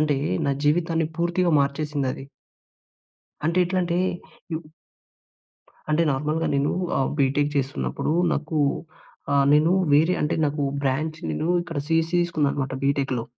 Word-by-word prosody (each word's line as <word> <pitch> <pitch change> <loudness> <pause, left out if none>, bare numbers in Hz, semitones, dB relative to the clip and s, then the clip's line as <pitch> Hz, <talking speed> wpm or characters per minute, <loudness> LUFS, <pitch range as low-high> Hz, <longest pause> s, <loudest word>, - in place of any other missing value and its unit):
అంటే, 150 -2 +2 0.3
నా 140 - +2
జీవితాన్ని 165 +1 +2
పూర్తిగా 175 +1 +1
మార్చేసిందది. 140 -1 -2 1.2
అంటే 170 +3 +1
ఎట్లంటే, 175 -1 0 0.6
ఇవ్ 160 - -4 1.3
అంటే 155 +2 +3
నార్మల్‌గా 150 +4 -1
నేను 140 +1 +1 0.3
ఆహ్, 135 - 0
బీటెక్ 140 +2 +2
జేస్తున్నప్పుడు 140 +2 -1 0.2
నాకు 155 +1 -2 0.7
ఆహ్, 140 -1 +4
నేను 155 +3 +4 0.2
వేరే 160 +5 +4
అంటే, 150 - 0
నాకు 145 0 -1 0.2
బ్రాంచ్ 150 +4 -1
నేను 155 - -2
ఇక్కడ 165 -3 -6
సిఎస్‌ఈ 165 +2 +1
తీసుకున్నా 165 -4 +1
అనమాట 135 -2 -3
బీటెక్‌లో. 135 -3 0
150 Hz, 120 wpm, -24 LUFS, 140-165 Hz, 1.3 s, ఆహ్